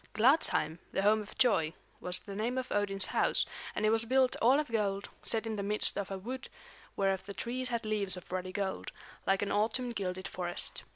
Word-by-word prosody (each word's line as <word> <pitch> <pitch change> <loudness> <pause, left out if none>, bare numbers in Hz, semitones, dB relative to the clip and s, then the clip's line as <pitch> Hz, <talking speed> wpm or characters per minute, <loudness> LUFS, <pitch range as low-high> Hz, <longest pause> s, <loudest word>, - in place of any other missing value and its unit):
Gladsheim, 215 - +3
the 195 - 0
home 215 +1 +4
of 210 - -11
joy, 175 -11 +3 0.3
was 180 0 -1
the 200 - -9
name 230 +5 -1
of 255 0 -3
Odin's 195 -2 0
house, - - +2 0.3
and 215 - 0
it 215 - +4
was 225 0 +3
built 255 +2 +3
all 255 +5 +6
of 305 - -1
gold, 200 -3 0
set 225 0 +1
in 220 -1 -3
the - - -1
midst 210 +1 +2
of 200 -2 -3
a 195 - -3
wood 250 +6 -6 0.5
whereof 195 -1 +1
the 200 - -6
trees 250 +2 -1
had 235 -2 -2
leaves 205 -3 0
of 180 - -11
ruddy 185 0 -3
gold, 195 0 -3 0.4
like 195 +1 +3
an 200 - -2
autumn 235 +4 +1
gilded 185 -3 -3
forest. 175 -1 +1
205 Hz, 210 wpm, -32 LUFS, 195-235 Hz, 0.5 s, all